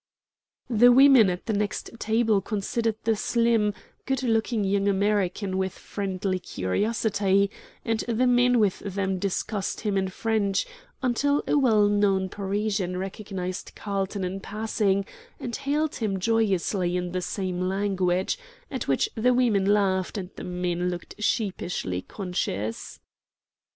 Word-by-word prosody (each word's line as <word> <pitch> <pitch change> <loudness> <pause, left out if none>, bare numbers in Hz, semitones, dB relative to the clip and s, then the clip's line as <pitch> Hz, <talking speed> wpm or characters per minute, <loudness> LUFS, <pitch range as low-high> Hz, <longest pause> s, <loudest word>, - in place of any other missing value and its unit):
The 245 0 +6
women 260 -5 +7
at 180 0 -4
the 220 - -1
next 210 0 -2
table 220 -2 +2
considered 220 +2 -1
the 225 0 +2
slim, 230 -1 +2 0.4
good 265 -1 0
looking 225 -2 +1
young 200 +1 +1
American 200 -1 +1
with 190 -1 -1
friendly 190 -2 -3
curiosity, 200 - 0 0.3
and 225 -2 0
the 240 +2 +2
men 245 0 +4
with 205 -4 +2
them 195 -1 -2
discussed 200 +1 -2
him 205 -3 0
in 190 - 0
French, 200 0 0 0.4
until 285 +4 +1
a - - +1
well 225 -7 +4
known 200 -2 +2
Parisian 200 -2 -2
recognized 190 -1 -5
Carlton 200 -1 -3
in 185 +2 -3
passing, 205 -2 0 0.3
and 235 - -4
hailed 290 +2 -1
him 200 -4 -1
joyously 190 -4 +1
in 180 -1 -3
the 185 0 -2
same 185 -1 -3
language, 190 - 0 0.3
at 260 - -4
which 135 - +2
the 245 +3 +2
women 225 -6 +3
laughed 195 -2 +1
and 185 -1 -5
the - - -8
men 180 0 -1
looked 175 +4 -7
sheepishly 180 - -1
conscious. 115 - -4
200 Hz, 135 wpm, -26 LUFS, 190-225 Hz, 0.4 s, women